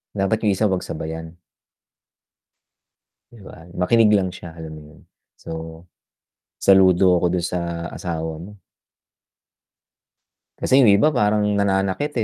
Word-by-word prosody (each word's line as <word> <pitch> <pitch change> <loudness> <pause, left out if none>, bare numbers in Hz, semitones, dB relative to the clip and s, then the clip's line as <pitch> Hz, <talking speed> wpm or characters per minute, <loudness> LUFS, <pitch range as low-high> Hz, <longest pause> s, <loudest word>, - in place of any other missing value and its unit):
dapat 100 +3 0
yung 105 -2 +2
isa 105 +2 +1
'wag 95 -2 -2
sabayan. 80 +2 -7 1.9
Di 115 -4 -15
ba? 85 -3 -13
Makinig 110 +4 +3
lang 95 -2 +1
siya 85 -2 -11
alam 80 -1 -9
mo - - -12
yun, - - -19 0.3
so, 80 0 -9 0.7
saludo 95 -2 +4
ako 90 - +1
dun 85 - -2
sa 85 -1 -4
asawa 80 -3 -5
mo. 100 +3 -12 2.0
Kasi 135 +1 +3
yung 120 - +5
iba 105 +10 +4
parang 105 -3 +1
nananakit 100 +8 -1
95 Hz, 125 wpm, -21 LUFS, 85-105 Hz, 2.0 s, yung